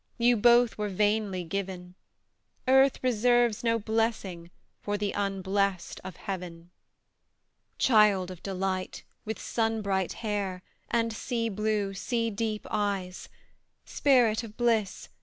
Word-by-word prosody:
You 240 Hz, 0 st, +4 dB
both 240 Hz, +1 st, +4 dB
were 210 Hz, -1 st, -1 dB
vainly 205 Hz, -1 st, 0 dB
given; 180 Hz, 0 st, -5 dB, 0.7 s
Earth 265 Hz, +1 st, +5 dB
reserves 240 Hz, -1 st, +2 dB
no 230 Hz, -1 st, +2 dB
blessing 220 Hz, -6 st, -2 dB, 0.3 s
For 205 Hz, 0 st, -2 dB
the 205 Hz, -1 st, -1 dB
unblest 195 Hz, -1 st, -1 dB
of 185 Hz, -2 st, -8 dB
heaven! 175 Hz, -3 st, -7 dB, 1.1 s
Child 210 Hz, -6 st, +4 dB
of 180 Hz, -, -10 dB
delight, 190 Hz, -1 st, -3 dB, 0.2 s
with 220 Hz, +1 st, -3 dB
sun 225 Hz, -1 st, -1 dB
bright 190 Hz, -2 st, 0 dB
hair, 195 Hz, -4 st, -2 dB, 0.3 s
And 230 Hz, -1 st, 0 dB
sea 230 Hz, 0 st, -2 dB
blue, 210 Hz, -1 st, -1 dB
sea 230 Hz, +3 st, -1 dB
deep 215 Hz, 0 st, -3 dB
eyes! 195 Hz, -3 st, -2 dB, 0.6 s
Spirit 245 Hz, -6 st, +3 dB
of 220 Hz, -1 st, -10 dB
bliss! 225 Hz, -5 st, 0 dB
210 Hz, 120 wpm, -28 LUFS, 190-230 Hz, 1.1 s, Earth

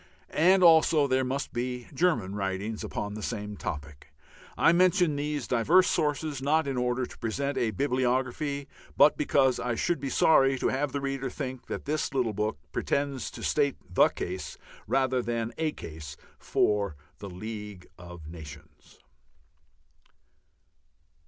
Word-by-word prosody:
And 185 Hz, +3 st, +5 dB
also 160 Hz, -2 st, +6 dB
there 130 Hz, -1 st, +1 dB
must 135 Hz, +2 st, -3 dB
be 125 Hz, 0 st, -3 dB
German 130 Hz, -, +1 dB
writings 100 Hz, +2 st, -3 dB
upon 105 Hz, 0 st, -4 dB
this 105 Hz, 0 st, -4 dB
same 105 Hz, -3 st, -5 dB
topic. 75 Hz, -5 st, -7 dB, 0.5 s
I 165 Hz, -, +5 dB
mention 180 Hz, -2 st, +3 dB
these 145 Hz, -3 st, -3 dB
diverse 160 Hz, +10 st, +4 dB
sources 150 Hz, -2 st, -1 dB
not 150 Hz, +2 st, +2 dB
in 135 Hz, -, -2 dB
order 125 Hz, 0 st, 0 dB
to -, -, -13 dB
present 140 Hz, +5 st, -2 dB
a 115 Hz, -, +1 dB
bibliography, 130 Hz, -, -1 dB, 0.3 s
but 150 Hz, -, +6 dB
because 135 Hz, -3 st, +2 dB
I 120 Hz, -1 st, -1 dB
should 175 Hz, +6 st, 0 dB
be 135 Hz, 0 st, -3 dB
sorry 135 Hz, -2 st, +4 dB
to -, -, 0 dB
have 140 Hz, +1 st, -1 dB
the 140 Hz, -, -3 dB
reader 135 Hz, -1 st, -2 dB
think 130 Hz, -2 st, -6 dB
that -, -, -5 dB
this 150 Hz, -1 st, -2 dB
little 120 Hz, -5 st, +1 dB
book 105 Hz, -2 st, -1 dB
pretends 140 Hz, -3 st, -1 dB
to -, -, -10 dB
state 140 Hz, -2 st, +1 dB, 0.2 s
the -, -, +6 dB
case 90 Hz, +1 st, -5 dB, 0.3 s
rather 130 Hz, -1 st, +1 dB
than 115 Hz, -1 st, -3 dB
a 160 Hz, -1 st, +1 dB
case 75 Hz, -, -9 dB, 0.2 s
for 100 Hz, -6 st, +1 dB, 0.2 s
the 100 Hz, -, -7 dB
League 105 Hz, 0 st, -7 dB
of 90 Hz, -3 st, -10 dB
Nations. 75 Hz, -2 st, -12 dB
130 Hz, 145 wpm, -28 LUFS, 105-145 Hz, 0.5 s, also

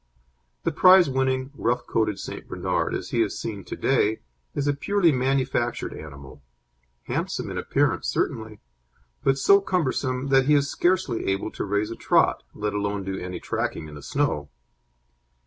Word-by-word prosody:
The 165 Hz, -, +1 dB
prizewinning 135 Hz, -7 st, +4 dB
rough 125 Hz, -2 st, -1 dB
coated 110 Hz, -3 st, 0 dB
St. -, -, -7 dB
Bernard, -, -, -1 dB
as -, -, -5 dB
he 115 Hz, -, +2 dB
is 110 Hz, -, -1 dB
seen 100 Hz, -3 st, -5 dB
to -, -, -5 dB
day 110 Hz, -5 st, +1 dB, 0.3 s
is 145 Hz, -, -1 dB
a 145 Hz, -, +3 dB
purely 175 Hz, +4 st, +2 dB
manufactured 130 Hz, -2 st, 0 dB
animal, 70 Hz, -2 st, -11 dB, 0.6 s
handsome -, -, -3 dB
in -, -, -5 dB
appearance -, -, 0 dB
certainly, 110 Hz, -1 st, -2 dB, 0.6 s
but 135 Hz, -, +3 dB
so 200 Hz, +8 st, +5 dB
cumbersome 140 Hz, -8 st, -1 dB
that 135 Hz, -1 st, +4 dB
he 150 Hz, -, +5 dB
is 140 Hz, -1 st, +2 dB
scarcely 175 Hz, -8 st, 0 dB
able 95 Hz, +2 st, -1 dB
to -, -, -4 dB
raise 105 Hz, +2 st, -1 dB
a -, -, -4 dB
trot, -, -, +2 dB
let 105 Hz, 0 st, -2 dB
alone 100 Hz, -1 st, -2 dB
do 95 Hz, 0 st, -4 dB
any 90 Hz, 0 st, -5 dB
tracking 80 Hz, -, -3 dB
in 75 Hz, -, -11 dB
the 75 Hz, -, -9 dB
snow. 75 Hz, -, -1 dB
125 Hz, 160 wpm, -25 LUFS, 100-140 Hz, 0.6 s, so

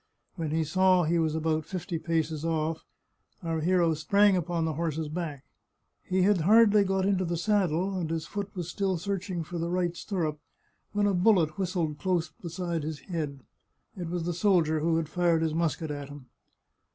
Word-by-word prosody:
When 165 Hz, -4 st, -3 dB
he 160 Hz, +1 st, +1 dB
saw 185 Hz, +3 st, +3 dB
he 170 Hz, +2 st, +1 dB
was 160 Hz, -1 st, +1 dB
about 160 Hz, 0 st, 0 dB
fifty 175 Hz, 0 st, -4 dB
paces 160 Hz, -2 st, -1 dB
oflf 160 Hz, -1 st, -1 dB, 0.6 s
our 165 Hz, -1 st, -1 dB
hero 170 Hz, 0 st, +3 dB
sprang 200 Hz, +6 st, +3 dB
upon 170 Hz, -2 st, -1 dB
the 160 Hz, -, -1 dB
horse's 160 Hz, -1 st, -2 dB
back. 155 Hz, -4 st, -5 dB, 0.6 s
He 185 Hz, 0 st, 0 dB
had 200 Hz, -1 st, +4 dB
hardly 210 Hz, +3 st, +6 dB
got 190 Hz, -1 st, 0 dB
into 195 Hz, -2 st, +2 dB
the 170 Hz, -1 st, -2 dB
saddle, 190 Hz, -1 st, +1 dB
and 175 Hz, -4 st, -2 dB
his 165 Hz, -1 st, -2 dB
foot 205 Hz, -1 st, -4 dB
was 175 Hz, -3 st, -4 dB
still 190 Hz, +1 st, -1 dB
searching 185 Hz, -1 st, -3 dB
for 170 Hz, +2 st, -6 dB
the 170 Hz, +1 st, -2 dB
right 175 Hz, -1 st, 0 dB
stirrup, 165 Hz, -7 st, -3 dB, 0.5 s
when 205 Hz, 0 st, +2 dB
a 200 Hz, -, +2 dB
bullet 180 Hz, -4 st, +3 dB
whistled 170 Hz, -5 st, -1 dB
close 175 Hz, -2 st, 0 dB
beside 170 Hz, 0 st, -4 dB
his 150 Hz, 0 st, -5 dB
head; 150 Hz, -6 st, -4 dB, 0.5 s
it 175 Hz, -4 st, -5 dB
was 175 Hz, -1 st, -2 dB
the 175 Hz, +1 st, -1 dB
soldier 170 Hz, -4 st, +2 dB
who 165 Hz, +1 st, +1 dB
had 165 Hz, -2 st, -1 dB
fired 170 Hz, 0 st, +1 dB
his 160 Hz, -1 st, 0 dB
musket 160 Hz, -1 st, -1 dB
at 145 Hz, -1 st, -6 dB
him. 145 Hz, -2 st, -10 dB
170 Hz, 185 wpm, -28 LUFS, 160-185 Hz, 0.6 s, hardly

